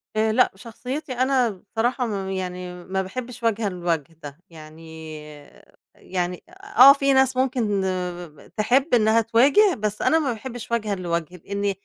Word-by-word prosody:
آآ، 220 0 +2
لأ، 250 +3 +3
شخصيتي 250 +7 -6
أنا 255 -1 +2
بصراحة 225 +6 -2
ما 200 -4 -3
ب - - -5
يعني 180 -1 -5
ما 190 +2 -2
باحبّش 240 +5 -7
وجهًا 225 -2 0
لوَجه 170 -4 -3
ده، 145 +1 -9
يعني 160 0 -11 0.8
يعني 180 -1 -4
آآ، 395 +2 -15
آه، 270 +2 +11
في 275 -1 +1
ناس 265 -1 +3
ممكن 240 -7 0
ب - - -2 0.5
ب - - -17
تحب 255 +7 +1
إنّها 225 -1 +4
تواجه 270 - +4
بس 210 -1 -3
أنا 320 - +3
ما 280 -5 -1
باحبّش 235 +1 -8
وجهًا 215 -3 -1
لوَجه 170 -1 -3
لإنّي 200 +3 -2
220 Hz, 160 wpm, -23 LUFS, 180-255 Hz, 0.8 s, آه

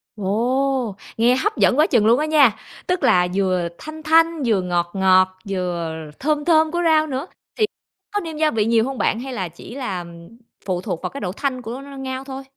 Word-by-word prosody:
Ồ, 240 +3 0 0.2
nghe 240 +3 +4
hấp 420 - -1
dẫn 255 - +3
quá 310 - +5
chừng 230 -5 +3
luôn 235 +4 +5
á 305 - +1
nha. 290 -8 +5 0.3
Tức 360 -1 0
là 180 0 +4
vừa 185 -3 +1
thanh 310 0 -9
thanh, 325 0 +3
vừa 215 -5 +2
ngọt 175 -1 -1
ngọt, 185 -1 +3
vừa 175 -4 -2 0.2
thơm 295 0 0
thơm 315 -2 +4
của 345 +1 -1
rau 315 -1 +4
nữa, 275 +3 -4 0.3
thì 435 - +3 0.5
có 410 - +1
nêm 325 -5 -6
gia 310 0 +2
vị 215 -2 +1
nhiều 225 0 +3
hông 270 0 -4
bạn? 225 - +1
Hay 265 +1 -6
là 185 -7 -3
chỉ 170 +8 -12
là 195 -10 -4 0.6
phụ 180 -2 -1
thuộc 170 -2 -4
vào - - -3
cái 280 - -8
độ 180 - -2
thanh 255 +4 -3
của 245 +2 -6
ngao 270 -1 -6
thôi? 270 0 -7
255 Hz, 210 wpm, -21 LUFS, 190-300 Hz, 0.6 s, quá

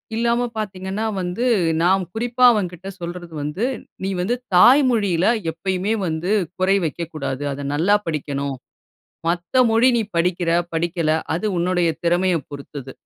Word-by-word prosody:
இல்லாம 235 +1 +1 0.2
பார்த்தீங்கன்னா, 195 0 -3 0.2
வந்து 180 +7 -2 0.4
நாம் 190 +2 +3
குறிப்பா 240 +2 -1
அவன்கிட்ட 185 -3 -3
சொல்றது 175 0 -7
வந்து, 165 +10 -2 0.4
நீ 190 - -1
வந்து 220 +7 0 0.2
தாய் 250 +11 +7
மொழியில 200 -7 +1 0.3
எப்பயுமே 190 +5 -2
வந்து 165 +4 -2 0.3
குறை 190 +1 +3
வைக்கக்கூடாது. 150 -4 -4
அத 140 +1 -6
நல்லா 180 +7 +3
படிக்கணும். 140 -3 -3 0.7
மத்த 175 +8 -2 0.2
மொழி 230 +3 +5
நீ - - +1
படிக்கிற 175 0 +1 0.2
படிக்கல 165 -1 0 0.2
அது 180 +6 -2
உன்னுடைய 175 0 +1
திறமையப் 175 -3 +1
பொறுத்தது. 140 -1 -8
180 Hz, 130 wpm, -21 LUFS, 165-200 Hz, 0.7 s, தாய்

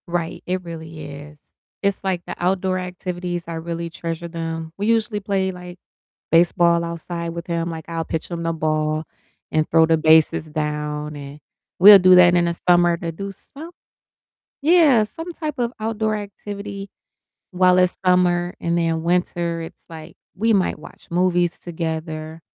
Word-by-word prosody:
Right, 170 -1 -3
it 185 0 -2
really 160 -2 -8
is, 145 +1 -10 0.5
it's 200 0 0
like, 185 -2 -1
the - - -6
outdoor 185 +1 0
activities, 180 -1 -4
I 170 - -5
really 170 +1 -4
treasure 165 0 -5
them, 165 -1 -5
we 205 +2 -2
usually 225 -2 +1
play, 195 -1 -1
like, 180 -1 -10 0.5
baseball 170 0 +4
outside 170 0 -5
with 170 0 -7
him, 170 0 -2
like, 160 -1 -7
I'll 165 -1 -3
pitch 160 - -4
him 170 -1 -4
the 165 0 -1
ball 155 -1 -1 0.5
and 155 0 +1
throw 165 0 +5
the 165 0 +3
bases 160 0 +4
down, 150 0 -3
and 140 +1 -9 0.4
we'll 200 +2 +10
do 185 0 +6
that 175 -1 +7
in 175 -1 +3
the 170 0 0
summer 175 -1 +5
to 170 -2 -4
do 195 +4 -6
some 300 - -11 0.9
Yeah, 300 -8 +5
some 325 +10 -7
type 310 -4 -5
of 240 -1 -1
outdoor 220 0 -1
activity 200 -1 -7 0.6
while 185 -1 +4
it's 180 -1 +3
summer, 180 -1 +2
and 170 0 0
then 165 -1 0
winter, 170 -1 0
it's 165 - -11
like, 160 0 -11 0.2
we 225 +3 +2
might 190 -3 +1
watch - - -14
movies 175 0 +1
together, 160 -1 -5
175 Hz, 160 wpm, -21 LUFS, 165-185 Hz, 0.9 s, we'll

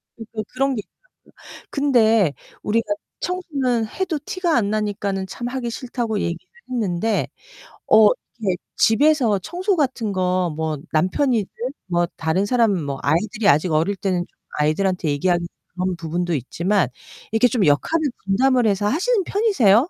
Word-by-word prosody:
그러니까 225 -1 -6
그런 270 +1 +1
게 215 - -2
있더라고요. - - -30 0.4
근데 225 - +3 0.3
우리가 225 +2 +1 0.3
청소는 275 -11 -1
해도 345 - -2
티가 355 -5 0
안 205 -4 +2
나니까는 205 -2 -2
참 240 +5 -5
하기 245 -1 -3
싫다고 235 -3 -3
얘기를 170 0 -1 0.3
했는데. 220 -3 0 0.6
어, 215 -1 +8 0.3
이렇게 190 -4 +1 0.2
집에서 245 -3 +4
청소 370 - -1
같은 260 - -1
거 185 -1 +1
뭐 160 -1 -2 0.2
남편이든 205 - +1 0.4
뭐 175 -1 +1
다른 160 +5 +1
사람 230 0 +3
뭐 140 -1 -4
아이들이 200 - +1
아직 155 +5 +3
어릴 165 +6 +2
때는 190 -2 0
좀 - - -41 0.2
아이들한테 170 +3 +1
얘기하기는 175 +4 +1
좀 - - -43 0.3
그런 185 - -1
부분도 170 +1 -2
있지만 170 - 0 0.5
이렇게 225 +3 +5
좀 220 -4 +1
역할을 300 - +2 0.2
분담을 250 +5 +3
해서 205 0 +1
하시는 390 - +1
편이세요? 315 - +3
215 Hz, 340 characters per minute, -22 LUFS, 180-255 Hz, 0.6 s, 어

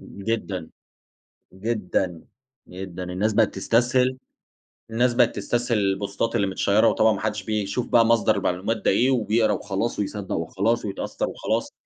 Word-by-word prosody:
جدًا، 100 -5 -4 0.8
جدًا، 95 -4 -2 0.5
جدًا، 90 -1 -7
الناس 95 +5 -1
بقيت 110 0 +2
تسْتسْهل 125 +5 +2 0.7
الناس 120 +2 +2
بقيت 120 -1 +3
تسْتسْهل 120 +3 0
البوستات 100 +2 -1
اللي 100 - +2
متْشيَّرة 100 +3 +2
وطبعًا 110 0 +4
ما - - -4
حدش 105 -2 -2
بيشوف 105 +3 -2
بقى 115 -1 +5
مصدر 115 -1 +3
المعلومات 95 +6 -1
ده - - +1
إيه، 125 +7 +3
وبيقرا 110 -2 +2
وخلاص 100 +4 -2
ويصدق 100 -1 -3
وخلاص 100 +8 0
ويتأثر 100 -2 -3
وخلاص. - - -2
105 Hz, 135 wpm, -24 LUFS, 95-115 Hz, 0.8 s, بقى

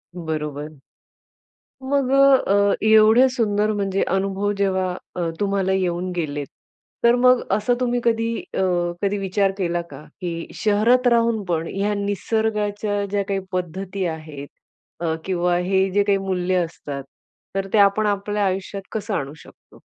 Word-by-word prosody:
बरोबर. 150 -3 -4 1.2
मग 270 -1 0
अ, 265 -8 +4
अ, - - +2
एवढे 220 +4 +6
सुंदर 215 -4 0
म्हणजे 195 -1 -1
अनुभव 195 +2 0
जेव्हा 190 -2 +1 0.3
अ, 170 -2 -1
तुम्हाला 195 -1 +1
येऊन 180 -1 -1
गेलेत. 145 -4 -3 0.6
तर 235 +1 +6
मग 250 0 +5 0.2
असं 230 +4 +1
तुम्ही 245 -1 0
कधी 230 0 +1 0.2
अ, - - -2 0.4
कधी 200 0 0
विचार 195 0 0
केला 175 -2 0
का? 140 +1 -10 0.2
की 170 -2 -4
शहरात 230 +4 +2
राहून 230 -2 +2
पण 165 -1 -1
ह्या 205 +1 0
निसर्गाच्या 205 0 -1
ज्या 200 -1 0
काही 195 -1 0
पद्धती 185 +2 -3
आहेत 155 -3 -6 0.6
अ, 160 -1 0
किंवा 180 -1 +1
हे 190 +2 +1
जे 205 +2 +3
काही 200 -1 +2
मूल्य 185 -1 -1
असतात. 145 -4 -7 0.5
तर 195 0 -1
ते 215 - +4
आपण 200 +2 +4
आपल्या 205 0 -1
आयुष्यात 195 +1 -3
कसं 210 -1 -3
आणू 140 -2 -3
शकतो? - - -18
195 Hz, 145 wpm, -22 LUFS, 180-215 Hz, 1.2 s, एवढे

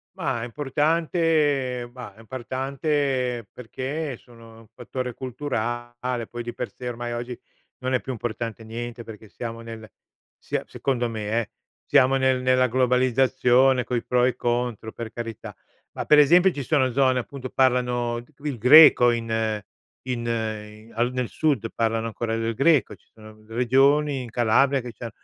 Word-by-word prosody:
Ma 115 - -2
è - - -3
importante 145 -2 0
bah 125 -5 -10
è 105 - -21
importante 130 0 -2
perché 135 +4 -5
sono 115 -2 -16
un 115 - -17
fattore 125 +1 -5
culturale, 120 -2 -4
poi 120 0 -6
di 120 0 -6
per - - -5
sé 125 - -8
ormai 120 0 -4
oggi 120 +1 -5 0.4
non 130 0 -2
è 125 - +2
più 130 - -5
importante 115 -1 -5
niente, 115 +1 -6
perché 110 -1 -11
siamo 115 +2 -7
nel 115 -1 -9 0.5
sia - - -3
secondo 120 -3 -1
me 110 -2 -4
eh, 110 - -8 0.3
siamo 130 +1 +4
nel 130 -1 +2
nella 130 0 +3
globalizzazione 130 +1 +3
coi 120 -2 -2
pro 125 0 +2
e - - +4
i - - -5
contro 120 -2 -2
per 115 0 -7
carità. 115 -2 -7 0.4
Ma - - -4
per 150 - +6
esempio 175 +6 +6
ci 145 - -5
sono 130 -2 +2
zone 130 0 +3
appunto, 130 +1 -5
parlano 125 -2 +1
g 120 - -21 0.2
il 135 -6 -3
greco 125 -1 +8
in 115 -1 -1 0.8
in 120 -2 -3
in 110 -1 -4
al 120 +2 0
nel 125 -2 -2
sud 140 -8 0
parlano 115 0 0
ancora 115 0 -3
del 115 0 -1
Greco, 145 +5 +3
ci - - -32
sono 110 -1 -14
r 110 0 -20
regioni 135 +4 +2
in 120 - -8
Calabria 120 +4 +3
che 125 0 -7
c'han 115 0 -7
125 Hz, 165 wpm, -24 LUFS, 115-130 Hz, 0.8 s, greco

